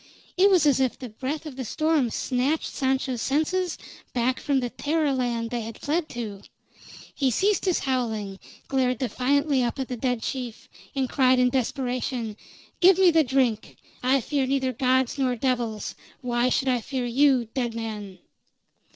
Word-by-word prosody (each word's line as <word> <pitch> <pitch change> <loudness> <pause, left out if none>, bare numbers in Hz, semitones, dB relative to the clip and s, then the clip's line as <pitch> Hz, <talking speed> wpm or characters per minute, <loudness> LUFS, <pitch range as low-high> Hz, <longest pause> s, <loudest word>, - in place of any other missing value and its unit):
It 385 +2 +5
was 360 -6 +4
as 285 -2 +4
if 260 -2 +1
the 255 - -7
breath 270 +8 -4
of 285 -4 -8
the 260 - -3
storm 310 +1 +1
snatched 260 +7 -1
Sancho's 265 -3 0
senses 325 +7 0 0.4
back 250 +1 +1
from 280 -2 +1
the 245 -2 -3
terror 300 -1 0
land 240 -3 -1
they 240 -1 -2
had 225 0 -7
fled 310 +2 -1
to; 215 -5 -6 0.7
he 270 -2 +1
ceased 390 - +1
his 365 -3 +2
howling, 220 -7 -2 0.3
glared 255 -2 +1
defiantly 265 +3 +1
up 240 - -2
at 265 -2 -4
the 250 - -2
dead 245 -1 -1
chief, 245 -4 -5 0.3
and 265 -1 0
cried 255 -1 +3
in 250 0 +3
desperation: 250 -3 -2 0.4
"Give 365 0 +6
me 375 -2 +6
the 320 -1 +4
drink! 250 -5 0 0.2
I 260 +2 +3
fear 275 +2 -1
neither 265 -1 0
gods 260 0 +1
nor 255 -2 +1
devils; 235 -4 -1 0.3
why 245 -1 +1
should 270 +1 0
I 250 -2 +1
fear 255 +2 -3
you, 260 0 +3
dead 240 -3 -2
man?" 210 -4 -5
255 Hz, 170 wpm, -25 LUFS, 240-280 Hz, 0.7 s, Give